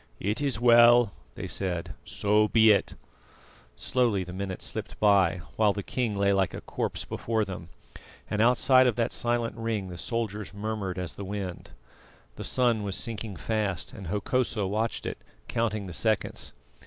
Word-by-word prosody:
"It 105 Hz, +7 st, -1 dB
is 135 Hz, -6 st, 0 dB
well," 120 Hz, -2 st, +6 dB, 0.2 s
they -, -, -5 dB
said; 90 Hz, -3 st, -2 dB
"so 105 Hz, +1 st, +2 dB
be 110 Hz, 0 st, +6 dB
it." 100 Hz, -, +1 dB, 0.8 s
Slowly 115 Hz, -, +1 dB
the 90 Hz, 0 st, -9 dB
minutes 95 Hz, 0 st, -4 dB
slipped -, -, -5 dB
by, 100 Hz, -4 st, +4 dB, 0.2 s
while 105 Hz, -2 st, +4 dB
the 100 Hz, -, -4 dB
king 115 Hz, -3 st, -2 dB
lay 100 Hz, 0 st, +3 dB
like 95 Hz, -1 st, +1 dB
a -, -, -6 dB
corpse -, -, -3 dB
before 110 Hz, -2 st, -1 dB
them, 90 Hz, -3 st, -8 dB, 0.6 s
and 105 Hz, 0 st, -1 dB
outside 130 Hz, +2 st, +5 dB
of 120 Hz, -, +1 dB
that 115 Hz, 0 st, 0 dB
silent 120 Hz, -1 st, 0 dB
ring 115 Hz, -4 st, -3 dB
the 90 Hz, -1 st, -7 dB
soldiers 105 Hz, -3 st, -3 dB
murmured 100 Hz, -3 st, -3 dB
as 90 Hz, -2 st, -4 dB
the 100 Hz, -, -7 dB
wind. 95 Hz, -2 st, -5 dB, 0.7 s
The -, -, -7 dB
sun 120 Hz, -4 st, +2 dB
was 100 Hz, -2 st, -2 dB
sinking 110 Hz, -3 st, -3 dB
fast, 100 Hz, -, -2 dB
and 100 Hz, -7 st, -8 dB
Hokosa 105 Hz, +3 st, 0 dB
watched 110 Hz, +4 st, -2 dB
it, -, -, -4 dB, 0.3 s
counting 110 Hz, -3 st, -1 dB
the 90 Hz, -, -7 dB
seconds. 110 Hz, +1 st, -1 dB
105 Hz, 165 wpm, -27 LUFS, 95-115 Hz, 0.8 s, well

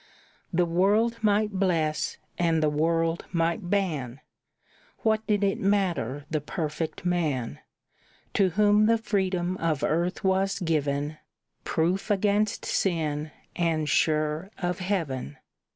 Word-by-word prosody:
The 175 Hz, -1 st, +2 dB
world 205 Hz, +7 st, +2 dB
might 210 Hz, 0 st, +2 dB
bless 170 Hz, -6 st, 0 dB, 0.2 s
and 165 Hz, -2 st, +1 dB
the 150 Hz, -, +3 dB
world 165 Hz, +2 st, +1 dB
might 170 Hz, +2 st, 0 dB
ban, 150 Hz, -11 st, -1 dB, 0.8 s
What 220 Hz, 0 st, +1 dB
did 205 Hz, -1 st, +2 dB
it 195 Hz, -1 st, +1 dB
matter 175 Hz, -, 0 dB
the 155 Hz, 0 st, -1 dB
perfect 155 Hz, +1 st, -4 dB
man, 150 Hz, -, -1 dB, 0.7 s
To 195 Hz, -2 st, +3 dB
whom 210 Hz, +3 st, +4 dB
the 230 Hz, 0 st, +4 dB
freedom 185 Hz, -4 st, -1 dB
of 160 Hz, -5 st, -1 dB
earth 170 Hz, +3 st, 0 dB
was 195 Hz, +1 st, +1 dB
given, 150 Hz, -4 st, -1 dB, 0.5 s
Proof 175 Hz, +6 st, 0 dB
against 205 Hz, +1 st, +1 dB
sin, 155 Hz, -5 st, 0 dB, 0.3 s
and 160 Hz, -3 st, 0 dB
sure 155 Hz, +3 st, +1 dB
of 180 Hz, -1 st, -2 dB
heaven? 160 Hz, -, -2 dB
175 Hz, 120 wpm, -27 LUFS, 155-195 Hz, 0.8 s, whom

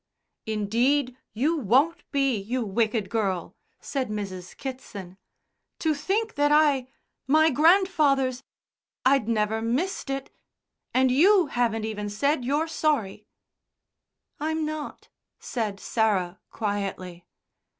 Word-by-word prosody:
"Indeed, 240 Hz, +5 st, +1 dB, 0.2 s
you 295 Hz, +9 st, 0 dB
won't 275 Hz, -, +2 dB
be, 275 Hz, -3 st, +1 dB
you 225 Hz, +4 st, -2 dB
wicked 215 Hz, 0 st, 0 dB
girl," 195 Hz, -6 st, -2 dB, 0.2 s
said 265 Hz, -5 st, -3 dB
Mrs. 190 Hz, -4 st, -6 dB
Kitson. 205 Hz, -9 st, -8 dB, 0.6 s
"To 320 Hz, -1 st, +1 dB
think 395 Hz, +10 st, -1 dB
that 290 Hz, 0 st, +2 dB
I 295 Hz, -4 st, +4 dB, 0.4 s
my 315 Hz, +3 st, +5 dB
grand 340 Hz, +8 st, +5 dB
father's 275 Hz, -7 st, +1 dB, 0.6 s
I'd 260 Hz, -4 st, +3 dB
never 220 Hz, 0 st, 0 dB
missed 270 Hz, +9 st, -2 dB
it. 270 Hz, 0 st, -4 dB, 0.6 s
And 260 Hz, 0 st, +3 dB
you 365 Hz, +7 st, +5 dB
haven't 225 Hz, -3 st, 0 dB
even 210 Hz, -1 st, -4 dB
said 280 Hz, +6 st, 0 dB
you're 290 Hz, +6 st, 0 dB
sorry." 230 Hz, -11 st, -1 dB, 1.1 s
"I'm 315 Hz, +1 st, -1 dB
not," 305 Hz, -1 st, -6 dB, 0.3 s
said 215 Hz, -5 st, -4 dB
Sarah 195 Hz, -4 st, 0 dB
quietly. 195 Hz, -4 st, -4 dB
255 Hz, 110 wpm, -26 LUFS, 210-295 Hz, 1.1 s, my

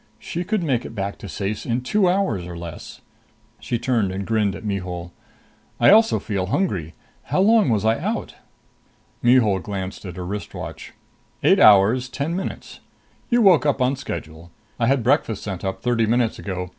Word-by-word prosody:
She 175 Hz, -, -5 dB
could 205 Hz, 0 st, -1 dB
make 130 Hz, -7 st, 0 dB
it -, -, -9 dB
back 100 Hz, 0 st, -4 dB
to 100 Hz, -, -8 dB
Ceyce 100 Hz, +1 st, -3 dB
in 120 Hz, +1 st, -1 dB
two 185 Hz, +9 st, +2 dB
hours 145 Hz, -, 0 dB
or 85 Hz, -1 st, -7 dB
less! 85 Hz, -2 st, -9 dB, 0.6 s
She 120 Hz, -, -2 dB
turned 115 Hz, -5 st, 0 dB
and 95 Hz, +1 st, -4 dB
grinned 105 Hz, -3 st, 0 dB
at -, -, -9 dB
Mihul. 90 Hz, -3 st, -4 dB, 0.7 s
"I -, -, +6 dB
also 225 Hz, +2 st, +5 dB
feel 100 Hz, -4 st, -3 dB
hungry. 95 Hz, -, -1 dB, 0.3 s
How -, -, -1 dB
long 210 Hz, -, +4 dB
was 110 Hz, -2 st, +1 dB
I 110 Hz, +1 st, +2 dB
out?" -, -, -3 dB, 0.9 s
Mihul 120 Hz, -6 st, +4 dB
glanced 95 Hz, -1 st, -6 dB
at 90 Hz, -2 st, -7 dB
her 90 Hz, -, -6 dB
wrist 100 Hz, +3 st, -6 dB
watch. -, -, -8 dB, 0.5 s
"Eight -, -, +5 dB
hours, 110 Hz, +5 st, +5 dB
ten 145 Hz, +6 st, -3 dB
minutes. 190 Hz, -, -6 dB, 0.5 s
You 240 Hz, -1 st, +3 dB
woke 185 Hz, -6 st, +6 dB
up 140 Hz, -, +1 dB
on 130 Hz, +2 st, +2 dB
schedule. 80 Hz, -8 st, -7 dB, 0.3 s
I 115 Hz, -, +2 dB
had 135 Hz, -2 st, +2 dB
breakfast 120 Hz, -4 st, +1 dB
sent 95 Hz, -4 st, -5 dB
up 95 Hz, -1 st, -4 dB
thirty 120 Hz, -3 st, +1 dB
minutes 120 Hz, 0 st, +1 dB
ago. 90 Hz, -2 st, -5 dB
110 Hz, 180 wpm, -22 LUFS, 95-135 Hz, 0.9 s, I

